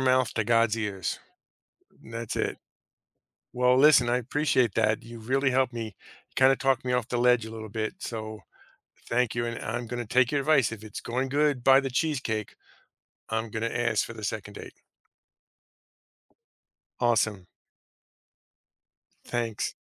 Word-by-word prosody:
mouth 130 -2 +2
to 110 - 0
God's 115 -1 +3
ears. 100 -5 -3 0.9
That's 115 -1 -5
it. - - -1 1.0
Well, 125 +1 +3
listen, 135 -4 +6
I 125 - +3
appreciate 130 -3 +1
that. 110 0 +1
You 115 0 -10
really 130 +4 +1
helped 130 -1 +1
me 110 -4 -5 0.4
kind 130 0 +6
of 135 - +1
talk 135 -2 +1
me 125 - -2
off 125 -1 0
the 120 - -2
ledge 125 -2 +4
a 110 - -8
little 110 -1 -7
bit, 110 0 -3
so, 110 -2 -6 0.7
thank 120 -1 +1
you, 120 0 0
and 115 0 -4
I'm 120 +2 -3
gonna 120 0 -4
take 125 +1 +3
your 145 - +1
advice. 135 -5 +3
If 110 -2 -8
it's 110 - -7
going 125 +3 -2
good 145 -2 +1
by 135 +1 +7
the 135 - -3
cheesecake, 125 -7 -2 0.7
I'm 110 0 -2
gonna 110 +2 -2
ask 120 -3 0
for - - -9
the - - -10
2nd - - -4
date. - - -9 2.3
Awesome. 110 -6 +1 1.8
Thanks. 115 -3 -2
120 Hz, 150 wpm, -27 LUFS, 110-130 Hz, 2.3 s, by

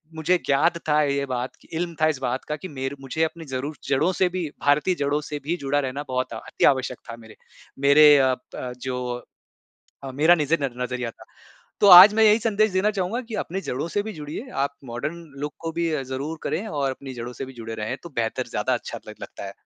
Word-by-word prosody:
मुझे 175 +3 +2
ज्ञात 155 +5 +2
था 150 0 +4
ये 140 -1 0
बात, 125 -1 -3 0.2
इल्म 170 0 -3
था 155 - +5
इस 155 -4 0
बात 125 0 -2
का 150 - 0
कि 170 +5 -8
मेरे 135 0 -4
मुझे 160 +5 -1
अपनी 165 0 -3
ज़रूर 135 +3 -4
जड़ों 150 +7 +2
से 185 0 +2
भी, 180 -3 -3
भारतीय 145 +6 +2
जड़ों 145 0 0
से 150 0 -6
भी 165 +4 -1
जुड़ा 140 0 0
रहना 140 +1 -3
बहुत 130 -2 -2
अति 110 - -1
आवश्यक 130 -2 +2
था - - -6
मेरे 110 -1 -14 0.5
मेरे 150 +1 +8
अ 130 -1 +3 0.2
अ, 125 - -5
जो 125 -1 -4 0.9
मेरा 160 +5 +5
नज़ 155 -1 -2
नज़रिया 125 -2 -3
था। - - -17 0.6
तो 205 - +6
आज 185 +4 +11
मैं 220 - +3
यही 215 +1 +6
संदेश 215 -1 +2
देना 190 +3 +2
चाहूँगा 200 +5 -2
कि 225 - -6
अपने 190 +3 -5
जड़ों 135 +6 -3
से 205 +4 -1
भी 220 0 -6
जुड़िए, 155 - -7
आप 140 +1 -1
मॉडर्न 125 +7 -4 0.2
लुक 150 0 -3
को 165 0 -4
भी 170 0 -1 0.2
ज़रूर 140 +5 -5
करें 185 +8 -2
और 140 -3 -1
अपनी 130 0 -8
जड़ों 120 +1 -6
से 135 - -6
भी 130 - -10
जुड़े 115 -1 -7
रहें 110 +4 -3
तो - - -7
बेहतर 115 -1 -1
ज़्यादा - - 0
अच्छा - - -5
ल - - -8
लगता - - -8
है। 95 - -7
145 Hz, 215 wpm, -24 LUFS, 130-170 Hz, 0.9 s, आज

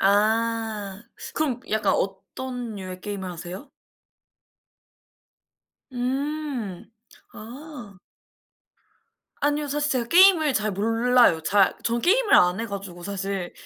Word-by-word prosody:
아. 215 0 +1 0.3
그럼 270 -6 -1
약간 220 0 +2
어떤 225 +5 -4
류의 185 -2 -7
게임을 195 -2 -5
하세요? 180 - -8 2.2
음. 260 - -3 0.4
아. 240 -3 -10 1.4
아니요. 290 0 0
사실 295 +1 0
제가 240 -3 0
게임을 345 -4 +6
잘 215 -3 0
몰라요. 225 -2 +3
잘 195 +2 +3
전 235 +1 0
게임을 425 - +3
안 180 +3 +4
해 230 - -3
가지고 195 -4 -7
사실. 195 -1 -4
225 Hz, 190 characters per minute, -24 LUFS, 195-265 Hz, 2.2 s, 게임을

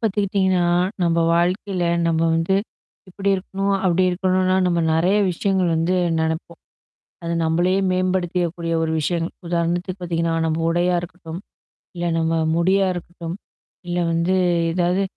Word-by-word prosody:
பாத்துக்கிட்டிங்கன்னா, 195 -4 +1 0.4
நம்ம 170 -1 +2 0.2
வாழ்க்கையில, 180 +1 0 0.2
நம்ம 165 -1 +1
வந்து, 165 +4 +1 0.5
இப்படி 195 +2 -3
இருக்கணும், 195 +1 -2
அப்படி 180 0 +3
இருக்கணுனா 185 0 +1
நம்ம 175 -1 +1
நெறய 180 +6 +2
விஷயங்கள் 185 +1 0
வந்து 165 +3 +1 0.2
நெனப்போம். 160 +1 -3 0.6
அது 170 0 -2
நம்மளையே 175 +4 +2
மேம்படுத்தியக்கக்கூடிய 180 -2 -1
ஒரு 160 - -1
விஷய. 170 +3 0 0.3
உதாரணத்துக்கு 175 +2 -1
பாத்திங்கன்னா, 165 -1 -1
நம்ம 160 0 -1
உடையா 175 +1 +1
இருக்கட்டும். 170 -1 -8 0.6
இல்ல, 175 - -3
நம்ம 165 0 0 0.2
முடியா 190 +3 +3
இருக்கட்டும். 170 -1 -7 0.5
இல்ல 175 0 -1
வந்து, 170 +3 +1 0.4
ஏதாவது 180 +2 +1
175 Hz, 125 wpm, -21 LUFS, 170-185 Hz, 0.6 s, அப்படி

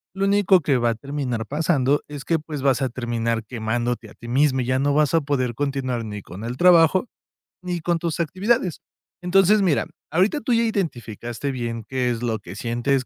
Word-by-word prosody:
Lo 195 +1 0
único 195 -2 +4
que 140 -2 +2
va 120 -1 +2
a - - -3
terminar 130 -3 -3
pasando 145 -2 +1
es 145 -2 -7
que, 165 +1 +1
pues, 150 -2 -6
vas 135 -1 +2
a 130 - 0
terminar 115 -2 -2
quemándote 115 0 -3
a - - -14
ti 120 - -12
misma 130 +1 +2
y - - -2
ya 130 +1 +1
no 140 +1 +1
vas 150 +1 +3
a 165 - +4
poder 130 -5 -1
continuar 130 -4 -2
ni 105 -1 -6
con 95 +4 -10
el 120 +2 -4
trabajo 175 - +5 0.6
ni 180 -1 -2
con 170 +1 0
tus 165 -1 -3
actividades. 185 - 0 0.4
Entonces 195 +3 +4
mira, 175 -7 +2 0.3
ahorita 195 - +2
tú 250 - 0
ya 230 0 +3
identificaste 125 - -3
bien 115 -3 -4
qué 130 -2 0
es 115 - -3
lo 110 -2 -1
que 95 -1 -10
sientes, 120 +3 0
140 Hz, 200 wpm, -23 LUFS, 120-170 Hz, 0.6 s, trabajo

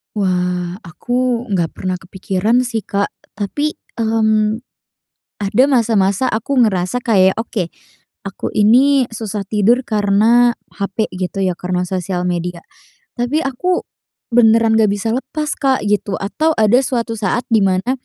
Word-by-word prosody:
Wah, 180 -2 -1
aku 245 +6 -2
enggak 175 -5 -1
pernah 185 -1 -3
kepikiran 190 +6 0
sih, 230 -4 -3
Kak, 200 0 -1 0.2
tapi, 290 +9 -2 0.2
mmm, 220 0 +1 0.8
ada 205 +6 +3
masa-masa 230 -3 +2
aku 230 +6 -2
ngerasa 190 +2 0
kayak 190 -5 +3
oke, 220 -4 -3 0.6
aku 195 -1 -6
ini 255 +5 +4
susah 215 -2 -4
tidur 215 +5 +2
karena 220 +3 +3 0.2
HP 200 +2 -3
gitu 185 +1 -3
ya, 180 -2 -1
karena 180 0 -2
sosial 180 0 -3
media. 175 -1 -3 0.6
Tapi 275 +7 0
aku 355 +8 -1 0.5
beneran 225 -1 +4
nggak 215 -2 +4
bisa 205 +2 -2
lepas, 300 +4 -3
Kak, 270 -2 +1
gitu, 205 -1 0
atau 310 +11 0
ada 220 +3 +4
suatu 235 -3 -2
saat 215 +4 0
di 225 - +4
mana, 190 +5 +1
215 Hz, 135 wpm, -17 LUFS, 190-240 Hz, 0.8 s, ini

